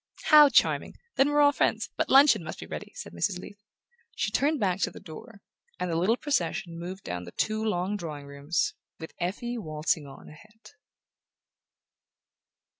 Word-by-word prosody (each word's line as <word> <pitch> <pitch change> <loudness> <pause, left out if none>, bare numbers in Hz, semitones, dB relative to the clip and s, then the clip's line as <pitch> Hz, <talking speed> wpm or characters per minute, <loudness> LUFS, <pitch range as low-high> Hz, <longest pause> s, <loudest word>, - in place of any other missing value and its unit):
"How 300 -2 +9
charming! 260 - +2 0.2
Then 275 +2 +4
we're 295 0 +3
all 285 0 +6
friends. - - 0
But - - -1
luncheon 270 - +6
must 155 - -7
be - - -7
ready," - - -7
said - - -8
Mrs. 85 - -1
Leath. 200 +3 -11 0.5
She 215 - -1
turned 290 +6 +1
back 190 -3 0
to - - +1
the - - -12
door, 200 +6 -12 0.4
and 180 -1 -2
the - - -1
little 190 +8 +2
procession 175 - -2
moved 185 +3 -7
down 90 0 -5
the 90 - -10
two 215 0 -1
long 200 -1 -1
drawing 155 -6 -7
rooms, 140 +4 -2 0.2
with 160 - -9
Effie 235 +7 -3
waltzing 155 -3 -2
on 135 - -13
ahead. 215 +9 -16
190 Hz, 170 wpm, -27 LUFS, 160-235 Hz, 0.5 s, How